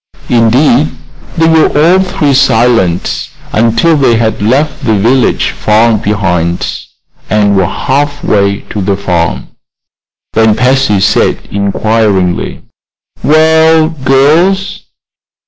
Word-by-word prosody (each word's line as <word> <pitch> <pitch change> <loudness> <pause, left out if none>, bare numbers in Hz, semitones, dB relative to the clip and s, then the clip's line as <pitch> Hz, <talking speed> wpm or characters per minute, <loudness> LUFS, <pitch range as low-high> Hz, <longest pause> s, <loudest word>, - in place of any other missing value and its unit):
Indeed, 125 +5 +2 0.4
they 165 0 +2
were 160 -1 +3
all 175 +5 +4
three 165 -6 -1
silent 115 -9 +1 0.2
until 115 +9 +2
they 130 -5 +2
had 110 -2 -1
left 135 +8 -1
the 110 - +1
village 120 +5 +1
far 110 +2 +1
behind 95 -5 -2 0.4
and 105 -1 +1
were 95 -2 +1
half 145 +6 -2
way 100 0 0
to 105 - -4
the 100 0 -1
farm. 85 -4 -2 0.8
Then 110 -1 +2
Patsy 125 -5 +1
said, 95 - 0
inquiringly: 100 -2 -1 0.6
"Well, 160 +1 +3
girls?" 160 +7 0
115 Hz, 105 wpm, -9 LUFS, 100-145 Hz, 0.8 s, all